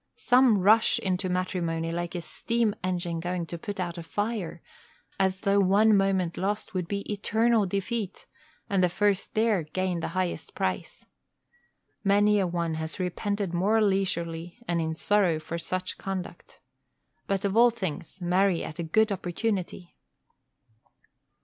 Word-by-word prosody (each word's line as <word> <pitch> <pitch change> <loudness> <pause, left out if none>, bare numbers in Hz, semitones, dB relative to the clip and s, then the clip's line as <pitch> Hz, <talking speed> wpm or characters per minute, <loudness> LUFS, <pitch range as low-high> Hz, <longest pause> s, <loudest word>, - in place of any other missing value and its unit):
_ - - -24
Some 250 -3 +5
rush 215 +4 +4
into 185 0 -1
matrimony 170 -3 -1
like 175 +1 -3
a 175 - -2
steam 230 +4 -1
engine 175 -2 -1
going 175 0 -2
to 170 - -6
put 200 +2 -6
out 175 -1 -3
a - - -4
fire, 190 -2 -3 0.6
as 190 -1 +1
though 200 -1 +3
one 205 +3 +5
moment 190 -3 +1
lost 205 +3 -2
would 180 -3 -2
be 200 +1 -2
eternal 220 +1 +1
defeat, 200 +2 -3 0.4
and 195 -2 +2
the 180 - +4
first 200 +2 0
there 215 -4 +3
gain 180 +3 -2
the - - -2
highest 185 -2 -2
prize. - - -3 1.0
Many 205 +1 +4
a 190 - +1
one 170 -2 -1
has 160 +4 -5
repented 195 +1 -2
more 200 +6 +2
leisurely 175 -4 -1
and 170 -1 +1
in 160 0 -2
sorrow 190 -2 +2
for 165 +2 -5
such 185 +2 -4
conduct. 190 -2 -6 0.7
But 195 0 -1
of 200 0 0
all 240 +1 +7
things, 185 -5 -5
marry 180 0 +2
at 155 - -7
a - - -1
good 215 +7 +2
opportunity. 185 -1 -3
185 Hz, 150 wpm, -27 LUFS, 175-205 Hz, 1.0 s, all